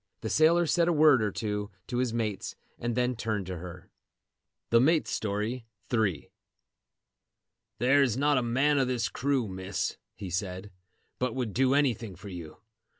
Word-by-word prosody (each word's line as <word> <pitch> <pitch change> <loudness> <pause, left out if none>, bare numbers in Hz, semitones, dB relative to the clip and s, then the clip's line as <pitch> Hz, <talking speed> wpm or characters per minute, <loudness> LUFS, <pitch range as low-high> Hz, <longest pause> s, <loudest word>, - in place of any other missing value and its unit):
The - - -3
sailor 170 +2 +4
said 170 +1 +2
a 175 - +3
word 150 -5 +6
or 105 -2 0
two 105 0 -3 0.2
to 125 - -4
his 125 -2 0
mates 110 -4 -3 0.2
and 120 -1 -2
then 125 0 +1
turned 110 -4 -2
to 90 0 -5
her. 90 0 -10 0.8
THE 115 0 +6
MATE'S 155 +4 +2
STORY.—III. 110 - -2 1.5
"There 135 +5 +4
is 125 -4 +2
not 145 0 +3
a - - -1
man 135 +5 +2
of 130 - +2
this 120 -3 -1
crew, 135 -3 0
Miss," 95 0 -3 0.2
he 95 -2 -7
said, 95 +2 -4 0.5
"but 125 -2 -1
would 120 -6 -2
do 130 +1 +3
anything 120 -8 0
for 95 +4 -10
you. 85 -4 -8
115 Hz, 160 wpm, -29 LUFS, 100-130 Hz, 1.5 s, word